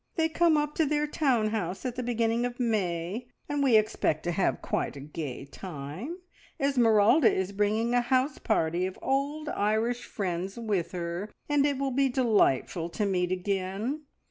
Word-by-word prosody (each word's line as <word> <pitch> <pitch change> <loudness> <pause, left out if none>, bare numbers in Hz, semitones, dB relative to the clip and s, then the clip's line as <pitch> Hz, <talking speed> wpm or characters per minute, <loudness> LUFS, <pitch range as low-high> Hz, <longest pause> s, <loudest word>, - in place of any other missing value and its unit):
They 320 -1 +2
come 330 -1 +3
up 295 0 0
to 320 - +3
their 300 +1 +1
town 260 -8 +1
house 195 -1 -3
at 250 -2 -2
the 255 - -2
beginning 230 -1 0
of 245 0 -3
May, 205 -1 -1 0.2
and 290 -1 -1
we 255 -5 +5
expect 210 -7 +1
to 175 - -1
have 180 +2 +1
quite - - -2
a - - -7
gay 145 -2 -6
time. 175 - -7 0.4
Esmeralda 245 -1 +5
is 190 +1 -1
bringing 210 +4 +1
a 245 - +4
house 255 +4 +1
party 175 -4 +1
of 190 - -8
old 285 +3 -1
Irish 220 +4 0
friends 190 0 -3
with 200 -7 -1
her, 175 +3 -4 0.2
and 290 -1 +3
it 285 -2 0
will 275 0 -1
be 270 +1 +2
delightful 205 - +2
to 210 +4 -1
meet 180 -2 0
again. 195 +9 -2
220 Hz, 170 wpm, -28 LUFS, 185-265 Hz, 0.4 s, we